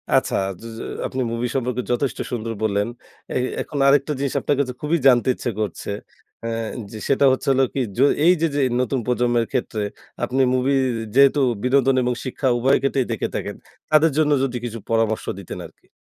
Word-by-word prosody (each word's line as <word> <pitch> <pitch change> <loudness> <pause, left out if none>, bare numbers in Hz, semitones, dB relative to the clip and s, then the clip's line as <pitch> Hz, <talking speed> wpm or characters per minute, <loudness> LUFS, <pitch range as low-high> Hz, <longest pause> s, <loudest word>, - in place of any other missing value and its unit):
আচ্ছা, - - +2 0.3
য - - -14 0.4
আপনি 130 - -3
মুভি 115 +1 -1
সম্পর্কে 125 -1 -1
যথেষ্ট 125 +2 0
সুন্দর 115 -2 -3
বললেন। 105 -1 +1 0.5
এ - - -4 0.3
এখন 150 - -6
আরেকটা 140 +2 +4
জিনিস 140 -1 -1
আপনার 145 - 0
কাছে 130 -3 0
খুবই 155 +3 +1
জানতে 125 -2 +5
ইচ্ছা 120 - -3
করছে। 100 -2 -4 0.6
আ - - -1 0.4
যে 110 - -7
সেটা 140 0 +3
হচ্ছে 130 - -2
হল 135 0 +3
কি? 135 - 0 0.2
যে 130 - +4 0.2
এই 175 - +7
যে 165 - +4
যে - - +1 0.2
নতুন 130 +1 0
প্রজন্মের 120 -1 +1
ক্ষেত্রে 115 -5 -2 0.4
আপনি 130 +2 +1
মুভি 130 +2 +2 0.4
যেহেতু 140 +1 +6 0.2
বিনোদন 135 +1 +3
এবং 125 0 +1
শিক্ষা 130 +1 -2
উভয় 130 +3 +3
ক্ষেত্রেই 135 -2 0
দেখে 110 - -1
থাকেন, - - -3 0.4
তাদের 155 0 +5
জন্য 155 -1 +3
যদি 125 -2 -1
কিছু 115 -1 -5
পরামর্শ 115 -1 +1
দিতেন 95 - -7
আরকি। - - -17
130 Hz, 180 wpm, -22 LUFS, 120-140 Hz, 0.6 s, এই